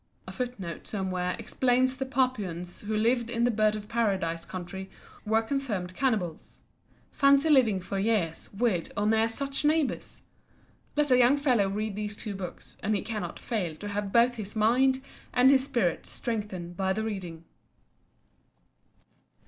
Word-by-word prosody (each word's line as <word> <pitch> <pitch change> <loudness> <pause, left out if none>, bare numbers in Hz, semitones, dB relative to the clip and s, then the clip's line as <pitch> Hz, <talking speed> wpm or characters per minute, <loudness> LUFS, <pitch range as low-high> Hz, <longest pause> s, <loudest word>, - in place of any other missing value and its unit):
A - - -6
footnote 240 -9 -5
somewhere 185 -3 -2
explains 255 0 +1
that 265 0 -3
the - - -13
Papuans 195 -10 -1
who 215 +1 -2
lived 235 +2 +2
in 235 -1 0
the 245 - +4
Bird 215 -1 +2
of 210 -1 -7
Paradise 190 -8 0
country 190 +1 -7 0.4
were 220 +1 +3
confirmed 220 -8 -2
cannibals. 210 - -2 0.5
Fancy 280 +2 +4
living 235 -9 +5
for 190 +2 -4
years 195 -6 0
with 200 -5 0
or 205 - +1
near 220 +1 +3
such 275 +5 -3
neighbours! 305 -1 0 0.7
Let 295 -2 +2
a 250 - +6
young 250 +3 +5
fellow 250 -9 +2
read 210 +1 -2
these 210 0 -3
two 210 - -5
books, 190 -3 -8
and 215 +1 +1
he 200 - -1
cannot 210 -6 -4
fail 185 -9 -3
to 205 +6 -7
have 205 -1 -3
both 240 +2 +4
his 210 0 -5
mind 260 +5 +3 0.3
and 255 +2 +6
his 265 -1 +4
spirit 235 - 0
strengthened 200 -7 -4
by 190 0 0
the 220 +3 -2
reading. 180 -7 -5
215 Hz, 155 wpm, -28 LUFS, 190-250 Hz, 0.7 s, a